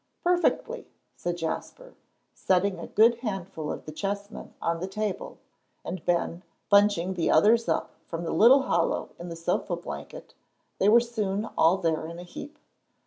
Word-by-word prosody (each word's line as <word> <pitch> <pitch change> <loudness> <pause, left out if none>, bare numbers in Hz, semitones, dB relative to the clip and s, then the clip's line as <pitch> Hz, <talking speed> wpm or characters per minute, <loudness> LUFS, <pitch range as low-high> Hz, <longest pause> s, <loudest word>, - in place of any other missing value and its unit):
"Perfectly," 360 +7 +1 0.3
said 175 0 -3
Jasper, 335 - -5 0.4
setting 190 +1 +1
a - - -6
good 230 +2 +4
handful 195 -8 -4
of - - -7
the 155 - -7
chessmen 200 +5 -5
on 165 0 -1
the 185 - -3
table, 215 - -4 0.5
and 185 - -5
Ben, 170 0 0 0.3
bunching 200 -3 +4
the 175 -3 0
others 225 +8 +4
up - - 0 0.2
from 165 0 -4
the 165 - -2
little 250 +10 +6
hollow 170 -8 0
in 175 +1 -7
the 165 - -6
sofa 165 0 -1
blanket, - - -8 0.5
they 200 - +4
were 235 +3 +8
soon 215 -4 -2
all 165 +4 +4
there 160 -3 -1
in 170 +1 -8
a 175 - -8
heap. 280 - -9
195 Hz, 160 wpm, -27 LUFS, 170-230 Hz, 0.5 s, were